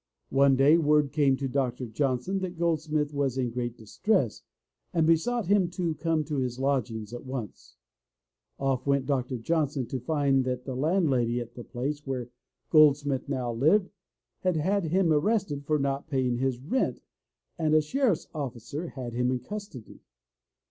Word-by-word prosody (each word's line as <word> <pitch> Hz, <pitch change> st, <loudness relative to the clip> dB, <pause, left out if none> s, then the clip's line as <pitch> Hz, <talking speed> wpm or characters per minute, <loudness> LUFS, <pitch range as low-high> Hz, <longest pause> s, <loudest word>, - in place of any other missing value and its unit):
One 135 Hz, 0 st, +5 dB
day 145 Hz, +5 st, +5 dB
word 150 Hz, -2 st, +3 dB
came 140 Hz, -3 st, +3 dB
to 135 Hz, -, -2 dB
Dr. 130 Hz, -1 st, -1 dB
Johnson 130 Hz, -, -1 dB
that 185 Hz, -2 st, -5 dB
Goldsmith 155 Hz, -3 st, 0 dB
was 140 Hz, -3 st, 0 dB
in 125 Hz, -2 st, 0 dB
great 120 Hz, 0 st, -3 dB
distress 130 Hz, -, 0 dB, 0.5 s
and 165 Hz, -2 st, +3 dB
besought 200 Hz, +8 st, +2 dB
him 190 Hz, -1 st, +3 dB
to 170 Hz, -3 st, 0 dB
come 160 Hz, 0 st, 0 dB
to 150 Hz, -1 st, -3 dB
his 125 Hz, -2 st, -2 dB
lodgings 120 Hz, -5 st, -1 dB
at 120 Hz, -, -6 dB
once. 130 Hz, -6 st, -7 dB, 0.8 s
Off 135 Hz, -1 st, -1 dB
went 140 Hz, -1 st, +2 dB
Dr. 130 Hz, -2 st, -1 dB
Johnson 145 Hz, 0 st, 0 dB
to 130 Hz, -, -4 dB
find 135 Hz, 0 st, +1 dB
that 125 Hz, 0 st, -3 dB
the 130 Hz, -, -4 dB
landlady 135 Hz, -6 st, +1 dB
at 120 Hz, 0 st, -7 dB
the 120 Hz, -, -8 dB
place 140 Hz, +5 st, -4 dB
where 125 Hz, -3 st, -3 dB, 0.4 s
Goldsmith 145 Hz, -3 st, +4 dB
now 125 Hz, -4 st, -2 dB
lived 170 Hz, -, +3 dB, 0.5 s
had 185 Hz, -2 st, 0 dB
had 190 Hz, +4 st, +1 dB
him 170 Hz, 0 st, +2 dB
arrested 155 Hz, -3 st, 0 dB
for 155 Hz, -, +3 dB
not 140 Hz, 0 st, -2 dB
paying 130 Hz, -4 st, 0 dB
his 130 Hz, 0 st, 0 dB
rent 165 Hz, -, -1 dB, 0.6 s
and 155 Hz, -1 st, +2 dB
a -, -, +7 dB
sheriff's 230 Hz, -, +1 dB
officer 140 Hz, +2 st, -5 dB
had 125 Hz, -6 st, -7 dB
him 125 Hz, +1 st, +1 dB
in 130 Hz, -, +1 dB
custody. 200 Hz, -, -8 dB
140 Hz, 160 wpm, -28 LUFS, 125-160 Hz, 0.8 s, a